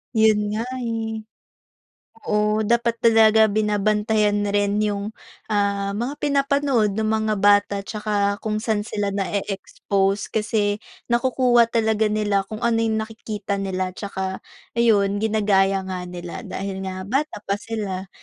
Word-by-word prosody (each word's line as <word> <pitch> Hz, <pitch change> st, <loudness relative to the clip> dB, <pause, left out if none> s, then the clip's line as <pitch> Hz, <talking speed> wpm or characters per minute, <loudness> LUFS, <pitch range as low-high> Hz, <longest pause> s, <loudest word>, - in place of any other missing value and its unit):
'Yon 220 Hz, -1 st, +5 dB, 0.2 s
nga, 225 Hz, -, -1 dB, 0.2 s
eh. 225 Hz, -2 st, -3 dB, 1.1 s
Oo, 210 Hz, +1 st, +1 dB
dapat 235 Hz, +1 st, +1 dB
talaga 220 Hz, -1 st, +5 dB
binabantayan 210 Hz, 0 st, +1 dB
rin 205 Hz, +1 st, +1 dB
'yong, 205 Hz, 0 st, -2 dB, 0.4 s
ah, 200 Hz, -1 st, 0 dB
mga 245 Hz, +7 st, -3 dB
pinapanood 275 Hz, -6 st, +1 dB
nung 220 Hz, 0 st, 0 dB
mga 220 Hz, -1 st, 0 dB
bata 205 Hz, 0 st, +4 dB
'tsaka 205 Hz, -1 st, -1 dB
kung 215 Hz, -1 st, -1 dB
saan 215 Hz, -1 st, 0 dB
sila 205 Hz, -2 st, -3 dB
na-eexpose, 195 Hz, 0 st, -1 dB
kasi 210 Hz, -1 st, 0 dB, 0.3 s
nakukuha 240 Hz, -1 st, +3 dB
talaga 220 Hz, -2 st, +1 dB
nila, 210 Hz, -2 st, +1 dB
kung 220 Hz, +2 st, -4 dB
ano 230 Hz, -1 st, +2 dB
yung 220 Hz, -1 st, +1 dB
nakikita 215 Hz, -2 st, -4 dB
nila 185 Hz, -1 st, -2 dB
tsaka 190 Hz, -1 st, -5 dB, 0.3 s
ayon 205 Hz, -4 st, +2 dB
ginagaya 195 Hz, -3 st, +2 dB
nga 185 Hz, -1 st, -4 dB
nila, 175 Hz, -1 st, -7 dB
dahil 190 Hz, 0 st, -5 dB
nga 185 Hz, 0 st, -5 dB
bata 275 Hz, +9 st, -1 dB
pa 200 Hz, +1 st, -2 dB
sila, 195 Hz, -4 st, -4 dB
210 Hz, 130 wpm, -22 LUFS, 200-220 Hz, 1.1 s, Yon